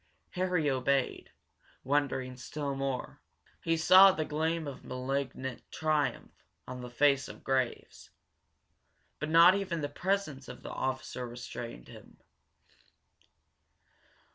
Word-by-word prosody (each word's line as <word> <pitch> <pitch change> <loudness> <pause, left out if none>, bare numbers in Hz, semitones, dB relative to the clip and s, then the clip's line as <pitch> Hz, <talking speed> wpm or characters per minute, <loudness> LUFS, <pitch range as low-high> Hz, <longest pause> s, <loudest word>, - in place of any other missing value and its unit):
Harry 180 -4 0
obeyed, 135 0 0 0.5
wondering 130 -2 0
still 140 +3 -4
more. 135 -1 -4 0.4
He 165 0 +1
saw 185 +4 +8
the 160 -4 -2
gleam 160 +2 -1
of 140 - -8
malignant 130 0 -3
triumph 155 -3 -1 0.4
on 125 0 -6
the 125 - -7
face 140 +2 +3
of - - -11
Graves. 130 -2 -2 1.1
But 155 - -3
not 170 +3 +8
even 185 -4 -2
the 145 - -2
presence 155 -4 -2
of - - -10
the - - -7
officer 130 -1 -3
restrained 120 - -8
him. - - -14
140 Hz, 115 wpm, -31 LUFS, 130-160 Hz, 1.1 s, saw